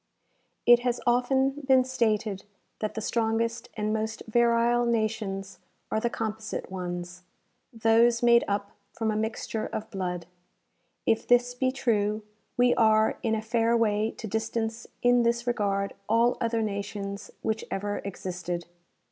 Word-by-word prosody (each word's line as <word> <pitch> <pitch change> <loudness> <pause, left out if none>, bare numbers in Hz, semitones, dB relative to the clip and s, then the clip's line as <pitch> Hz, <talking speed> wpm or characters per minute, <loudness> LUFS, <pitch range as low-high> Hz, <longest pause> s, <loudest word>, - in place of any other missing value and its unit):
It 240 0 +8
has 245 0 -1
often 265 +2 +3 0.2
been 260 -1 +6
stated 220 -6 0 0.4
that 215 - -3
the 220 - -3
strongest 230 +1 -1
and 215 0 0
most 220 0 -3
virile 235 +1 +3
nations 215 -4 -1 0.3
are 220 - +1
the 235 - 0
composite 220 -4 -4
ones, 180 -1 -5 0.5
those 230 +1 +3
made 235 0 +6
up 200 0 -2 0.2
from 225 -1 -1
a - - -2
mixture 220 0 -2
of 215 - -5
blood. 180 -3 -3 0.8
If 225 0 +1
this 245 0 +4
be 255 +1 0
true, 215 -5 0 0.3
we 245 0 +5
are 220 -1 +3
in 225 -1 +1
a 215 - -3
fair 230 +1 +2
way 215 -1 +2
to - - -6
distance 225 +1 -2 0.2
in 245 0 +5
this 235 0 +1
regard 200 -4 0 0.2
all 230 +2 +4
other 230 -1 +1
nations 200 -1 -4
which 220 0 -1
ever 205 +1 -2
existed. 180 -3 -5
220 Hz, 140 wpm, -27 LUFS, 205-235 Hz, 0.8 s, It